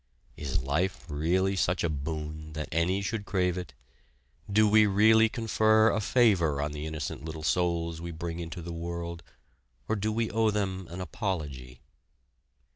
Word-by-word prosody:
Is 70 -3 -2
life 85 +8 -1
really 90 +6 +1
such 90 -1 +1
a - - +3
boon 75 +1 -5
that 75 0 -5
any 90 +5 +1
should 105 +1 -2
crave 90 -3 0
it? 90 -9 -6 0.8
Do 110 +1 +5
we 105 0 +6
really 110 +3 +5
confer 110 -1 +3
a 110 - 0
favor 95 - +3
on 75 +1 -1
the 75 +1 -5
innocent 75 -3 -5
little 80 -1 -6
souls 85 0 0
we 85 - -5
bring 85 +1 -5
into 85 0 -6
the 85 0 -6
world, 85 0 -5 0.7
or 110 - +1
do 110 +1 -1
we 115 +1 -1
owe 110 0 +2
them 95 -3 -2
an 90 +2 -6
apology? 75 - -4
85 Hz, 160 wpm, -29 LUFS, 80-100 Hz, 0.8 s, we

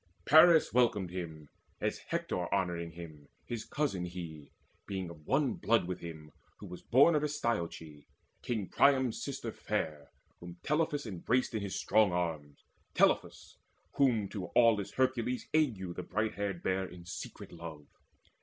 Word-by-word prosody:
Paris 160 +1 +7
welcomed 110 -7 +2
him, 80 -4 -6 0.3
As - - -1
Hector 90 -1 -3
honouring 85 -3 -1
him, 80 -4 -10 0.2
his 120 -2 -4
cousin 140 -12 -2
he, 85 -4 -8 0.4
Being 95 -3 -4
of 75 -2 -15
one 135 -1 +2
blood 115 -4 +2
with 90 0 -4
him, 80 -3 -9 0.3
who - - -10
was 90 - -9
born 140 +7 +5
Of 150 -1 +1
Astyoche, 85 - -3 0.3
King 110 -6 -2
Priam's 130 -4 +3
sister - - -4
fair 75 -3 -3 0.3
Whom 85 0 -10
Telephus 150 -1 0
embraced 115 +6 0
in 110 - -1
his 100 -1 -4
strong 105 -2 +3
arms, 80 -5 -3 0.3
Telephus, - - +1 0.4
whom 120 -7 +3
to 95 -4 -5
aweless 110 -5 +4
Hercules 130 -1 0
Auge 110 - +1
the - - -4
bright 105 +4 -1
haired 100 -4 -3
bare 95 0 0
in 90 -1 -12
secret 90 +2 -8
love. 80 -3 -9
95 Hz, 145 wpm, -32 LUFS, 85-120 Hz, 0.4 s, Paris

